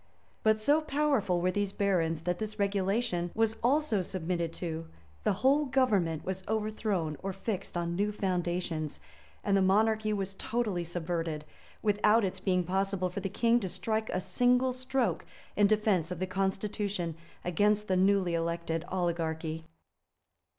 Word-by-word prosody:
But 220 Hz, 0 st, +3 dB
so 290 Hz, +8 st, +3 dB
powerful 275 Hz, -, +1 dB
were 180 Hz, +1 st, +2 dB
these 205 Hz, +1 st, -1 dB
barons, 170 Hz, -6 st, +1 dB
that 175 Hz, +1 st, -1 dB
this 215 Hz, 0 st, -4 dB
regulation 200 Hz, -2 st, 0 dB
was 225 Hz, 0 st, +1 dB
also 260 Hz, -5 st, +2 dB
submitted 170 Hz, -2 st, -2 dB
to; 165 Hz, -2 st, -4 dB, 0.4 s
the -, -, +3 dB
whole 285 Hz, +3 st, +5 dB
government 205 Hz, -, +1 dB
was 190 Hz, 0 st, -2 dB
overthrown 210 Hz, -7 st, -1 dB
or 195 Hz, -, -2 dB
fixed 195 Hz, -2 st, -4 dB
on 170 Hz, 0 st, -1 dB
new 205 Hz, +3 st, +1 dB
foundations; 175 Hz, -5 st, -2 dB, 0.4 s
and 200 Hz, -1 st, +2 dB
the 195 Hz, -, +4 dB
monarchy 215 Hz, +3 st, +3 dB
was 195 Hz, -2 st, -2 dB
totally 210 Hz, -4 st, -1 dB
subverted, 165 Hz, -2 st, -3 dB, 0.4 s
without 210 Hz, +1 st, +4 dB
its 190 Hz, 0 st, -3 dB
being 185 Hz, -1 st, +1 dB
possible 190 Hz, 0 st, 0 dB
for 195 Hz, -, -4 dB
the 195 Hz, 0 st, -3 dB
king 235 Hz, +4 st, +3 dB
to 190 Hz, -5 st, -3 dB
strike 220 Hz, +3 st, -1 dB
a 185 Hz, -, -1 dB
single 250 Hz, +4 st, +2 dB
stroke 255 Hz, -8 st, -1 dB, 0.3 s
in 205 Hz, -1 st, +5 dB
defence 210 Hz, -6 st, +2 dB
of 180 Hz, -, -4 dB
the 185 Hz, -, -1 dB
constitution 195 Hz, -2 st, -2 dB, 0.3 s
against 205 Hz, +4 st, +2 dB
the 185 Hz, -, +2 dB
newly 190 Hz, -1 st, +3 dB
erected 170 Hz, 0 st, -1 dB
oligarchy. 165 Hz, -3 st, -2 dB
195 Hz, 150 wpm, -30 LUFS, 175-215 Hz, 0.4 s, whole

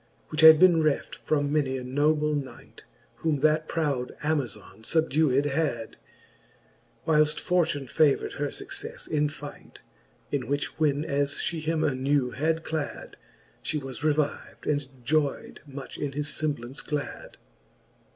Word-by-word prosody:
Which 155 Hz, -, -1 dB
had 160 Hz, -1 st, +10 dB
beenc 175 Hz, -3 st, +6 dB
reft 150 Hz, -2 st, 0 dB
from 145 Hz, -1 st, -1 dB
many 135 Hz, -3 st, +1 dB
a 130 Hz, -, -5 dB
noble 150 Hz, +4 st, +2 dB
knight; 135 Hz, -5 st, -7 dB, 0.3 s
Whom 155 Hz, -4 st, 0 dB
that 155 Hz, +1 st, +3 dB
proud 140 Hz, -6 st, -1 dB
Amazon 125 Hz, -9 st, -2 dB
fubdewed 150 Hz, 0 st, +2 dB
had, 140 Hz, -6 st, -1 dB, 1.1 s
Whilcfl: 155 Hz, -1 st, +3 dB
fortune 165 Hz, -6 st, +1 dB
favourd 145 Hz, +2 st, +2 dB
her 145 Hz, -, 0 dB
fuccelTe -, -, -7 dB
in 150 Hz, -1 st, +1 dB
fight, 145 Hz, -1 st, -11 dB, 0.5 s
In 135 Hz, -5 st, -1 dB
which 145 Hz, +3 st, -2 dB
when 150 Hz, -1 st, +2 dB
as 140 Hz, -1 st, 0 dB
fhe 165 Hz, -2 st, -2 dB
him 160 Hz, 0 st, 0 dB
anew 135 Hz, -2 st, +1 dB
had 160 Hz, +4 st, 0 dB
clad, 155 Hz, -3 st, -4 dB, 0.5 s
She 155 Hz, -, -2 dB
was 135 Hz, -2 st, -6 dB
reviv'd, 150 Hz, -1 st, -1 dB
and 145 Hz, -1 st, +1 dB, 0.2 s
joyd 150 Hz, 0 st, 0 dB
much 140 Hz, -1 st, -8 dB
in 140 Hz, -1 st, -2 dB
his 150 Hz, +2 st, -2 dB
femblance 145 Hz, -4 st, -3 dB
glad. 150 Hz, -2 st, -5 dB
145 Hz, 135 wpm, -27 LUFS, 140-155 Hz, 1.1 s, had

